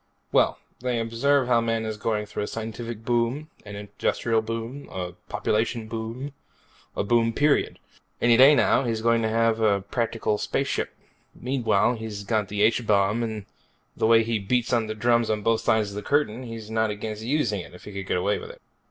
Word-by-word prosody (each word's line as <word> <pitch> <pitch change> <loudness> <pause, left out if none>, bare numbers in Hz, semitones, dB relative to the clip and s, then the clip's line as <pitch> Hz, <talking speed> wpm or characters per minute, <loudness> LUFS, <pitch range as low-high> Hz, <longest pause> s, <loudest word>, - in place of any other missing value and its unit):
"Well, - - +3 0.2
they 125 -1 -1
observe 125 +5 +2
how 120 -2 +4
man 115 -1 -1
is 110 0 -3
going 105 0 -1
through 105 - -5
a 105 - -2
scientific 115 0 -6
boom, 120 +6 0 0.2
an 100 - -7
industrial 110 +2 -1
boom, 115 +5 -5
a 90 -1 -4 0.2
population 110 +1 -1
boom. 115 +5 -5 0.6
A - - 0
boom, 115 +1 +2
period. 145 +3 +2 0.4
Any 120 -1 +5
day 135 +5 +8
now 135 - +3
he's 115 -3 -2
going 115 0 +3
to 110 - 0
have 110 -3 +1
practical 115 -3 -1
space - - -1
ships. - - -2 0.4
Meanwhile, 120 -2 +1
he's 110 -2 -6
also 100 - -16
got 110 -3 +1
the 105 +1 0
H 115 +1 +2
Bomb 105 +2 +3
and 110 -3 -4 0.5
the - - +1
way 115 0 +6
he 115 -1 -1
beats 120 +5 0
the 110 -3 0
drums 115 +1 +2
on 105 -1 -1
both 115 0 +2
sides 110 -2 +2
of 100 - -9
the 105 - -3
Curtain, 130 -3 0
he's 115 -2 -8
not 110 0 +1
against 105 +1 -5
using 120 -4 0
it, 90 - -12
if - - -14
he 105 - -9
could 95 -1 -6
get - - +1
away 100 +3 0
with - - -9
it." - - -12
115 Hz, 195 wpm, -25 LUFS, 105-120 Hz, 0.6 s, day